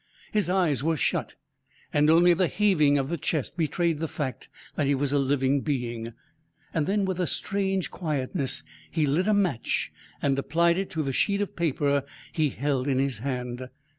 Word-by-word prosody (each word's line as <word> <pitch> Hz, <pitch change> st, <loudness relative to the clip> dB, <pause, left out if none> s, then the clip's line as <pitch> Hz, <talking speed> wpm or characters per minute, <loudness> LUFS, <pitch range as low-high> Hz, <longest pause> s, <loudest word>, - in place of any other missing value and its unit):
His 205 Hz, -5 st, +1 dB
eyes 170 Hz, -9 st, +2 dB
were 165 Hz, 0 st, +1 dB
shut, -, -, -1 dB, 0.6 s
and 150 Hz, +1 st, +4 dB
only 175 Hz, +2 st, +6 dB
the 180 Hz, +1 st, +2 dB
heaving 170 Hz, -8 st, +3 dB
of 135 Hz, 0 st, -1 dB
the 170 Hz, -, -2 dB
chest 155 Hz, -2 st, -2 dB
betrayed 165 Hz, -1 st, 0 dB
the 160 Hz, -, -1 dB
fact 140 Hz, -4 st, -5 dB, 0.2 s
that 145 Hz, -, 0 dB
he 140 Hz, -, +3 dB
was 140 Hz, +1 st, -1 dB
a 145 Hz, -, +3 dB
living 135 Hz, 0 st, +2 dB
being. 120 Hz, -5 st, -3 dB, 0.6 s
Then, 195 Hz, +6 st, +1 dB
with 190 Hz, -1 st, -2 dB
a 180 Hz, -, +1 dB
strange 195 Hz, -2 st, -1 dB
quietness, 140 Hz, -, -2 dB, 0.3 s
he 155 Hz, -, +1 dB
lit 155 Hz, +8 st, +1 dB
a 215 Hz, -, +4 dB
match 180 Hz, -, 0 dB, 0.3 s
and 135 Hz, -1 st, +1 dB
applied 170 Hz, +5 st, +2 dB
it 195 Hz, -, -3 dB
to 160 Hz, -5 st, -2 dB
the 135 Hz, -2 st, -2 dB
sheet 200 Hz, +8 st, +1 dB
of 205 Hz, -, -3 dB
paper 145 Hz, -4 st, +1 dB, 0.3 s
he 155 Hz, -2 st, +1 dB
held 135 Hz, 0 st, -1 dB
in 135 Hz, -2 st, +1 dB
his 135 Hz, -4 st, 0 dB
hand. 125 Hz, 0 st, -4 dB
150 Hz, 180 wpm, -27 LUFS, 135-175 Hz, 0.6 s, only